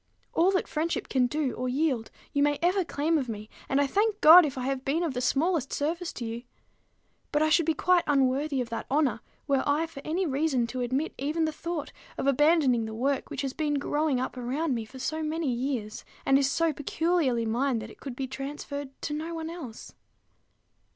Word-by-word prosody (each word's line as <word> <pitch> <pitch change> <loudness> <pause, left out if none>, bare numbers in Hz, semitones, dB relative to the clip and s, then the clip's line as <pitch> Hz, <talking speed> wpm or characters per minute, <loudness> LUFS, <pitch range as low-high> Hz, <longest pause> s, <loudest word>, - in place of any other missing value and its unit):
All 345 +3 +4
that 375 - 0
friendship 320 +2 -2
can 255 -2 +3
do 295 -1 -1
or 255 0 -3
yield, 260 -4 0 0.2
you 285 - +2
may 290 0 +3
ever 365 +2 +3
claim 315 0 0
of 255 -4 -4
me; 215 -1 -6 0.2
and 270 - +2
I 285 - +4
thank 410 +8 +1
God 330 0 +9
if 275 -1 -6
I 255 - -3
have 265 0 -2
been 305 +6 0
of 320 -5 -1
the 250 - -2
smallest 280 +3 +1
service 335 +4 -2
to 240 - -5
you: 230 +1 -4 0.9
but 295 0 +2
I 310 - +3
should 320 +1 +3
be 320 - +2
quite 360 +2 +3
unworthy 275 0 +2
of 240 - -4
that 230 - -4
honor, 275 -6 +2 0.3
were 275 -2 +2
I 295 +3 +1
for 315 -4 -10
any 350 +5 -1
reason 275 -4 +1
to 250 +2 -4
admit 260 +6 -1
even 305 +4 0
the 315 - -1
thought 325 0 -5 0.3
of - - -2
abandoning 275 -4 +3
the 220 0 -6
work 270 +4 -1
which - - -4
has 270 -1 -2
been 300 -1 -1
growing 290 -1 0
up 255 0 -3
around 265 +5 -1
me 230 -2 -3
for 255 +5 -13
so 315 +4 -2
many 310 -3 -1
years, 240 -4 -3 0.2
and 270 0 +5
is 275 -1 +2
so 330 +2 +1
peculiarly 290 -4 0
mine 245 +3 +1
that 220 0 -6
it - - -16
could 270 -4 -7
be 270 - -3
transferred 275 +1 -6
to 295 - -2
no 320 +3 -4
one 325 0 -4
else. 270 -10 -9
285 Hz, 215 wpm, -28 LUFS, 255-320 Hz, 0.9 s, God